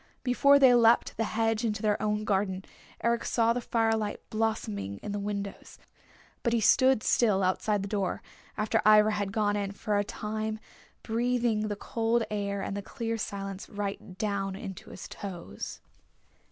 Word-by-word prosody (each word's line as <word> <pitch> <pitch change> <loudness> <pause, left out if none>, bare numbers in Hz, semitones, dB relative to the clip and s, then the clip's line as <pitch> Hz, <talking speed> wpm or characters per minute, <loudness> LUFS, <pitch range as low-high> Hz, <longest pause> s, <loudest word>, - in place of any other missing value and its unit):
Before 280 +3 +5
they 265 -3 +7
leapt 235 -1 +4
the 225 - 0
hedge 225 +1 0
into 215 -1 -1
their 210 -1 +1
own 210 0 0
garden 190 -2 -1 0.4
Eric 235 0 +1
saw 230 -1 +2
the 245 - -2
firelight 225 -3 0
blossoming 105 - -2
in 205 - -4
the 205 - -2
windows. 200 -1 -5 0.6
But 235 - 0
he 235 - +3
stood 260 +2 +4
still 205 -5 +3
outside 195 +2 +1
the - - -4
door, 195 -3 -2 0.3
after 215 0 +1
Ivra 215 0 +6
had 205 -2 -2
gone 205 0 +1
in, 200 -1 -2
for 210 +1 -2
a - - +2
time, 215 +1 -4 0.4
breathing 235 -2 0
the 205 - -2
cold 230 +2 0
air 200 -1 -2
and 195 - -3
the 200 - -3
clear 230 +2 -4
silence 195 -2 -5
right 200 -2 -5
down 195 -2 -1
into 195 -1 -8
his - - -9
toes. 175 - -7
210 Hz, 165 wpm, -29 LUFS, 200-225 Hz, 0.6 s, they